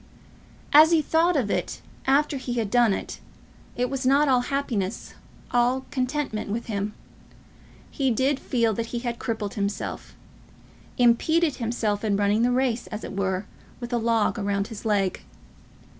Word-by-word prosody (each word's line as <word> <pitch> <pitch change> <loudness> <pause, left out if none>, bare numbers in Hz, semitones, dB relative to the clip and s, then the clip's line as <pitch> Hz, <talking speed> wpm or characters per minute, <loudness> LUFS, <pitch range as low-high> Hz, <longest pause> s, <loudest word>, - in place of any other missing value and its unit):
As 310 +2 +9
he 335 -1 +4
thought 330 +4 +2
of 235 -8 0
it - - -2 0.3
after 285 +1 +3
he 255 -2 -4
had 225 -4 -2
done 240 -3 +4
it, - - -4 0.6
it 250 +1 0
was 270 +1 -3
not 280 +3 +4
all 255 -2 +4
happiness, 245 -7 -3 0.4
all 245 +2 +2
contentment, 255 -5 -2
with 230 +3 -3
him. 210 -1 -3 1.0
He 270 -2 0
did 265 +4 +1
feel 230 -3 +1
that 230 +2 -3
he 240 - -4
had 235 -1 -3
crippled 220 -4 -3
himself, 200 0 -4 0.8
impeded 290 +6 +3
himself 225 -3 -1
in 205 -2 +1
running 205 +2 +2
the 240 - +3
race, 250 -2 0
as 215 0 -6
it - - -6
were, 190 0 -1 0.3
with 240 0 -6
a 240 - +2
log 230 0 +1
round 200 0 -1
his 225 -1 -9
leg. 200 -3 0
240 Hz, 160 wpm, -25 LUFS, 210-265 Hz, 1.0 s, As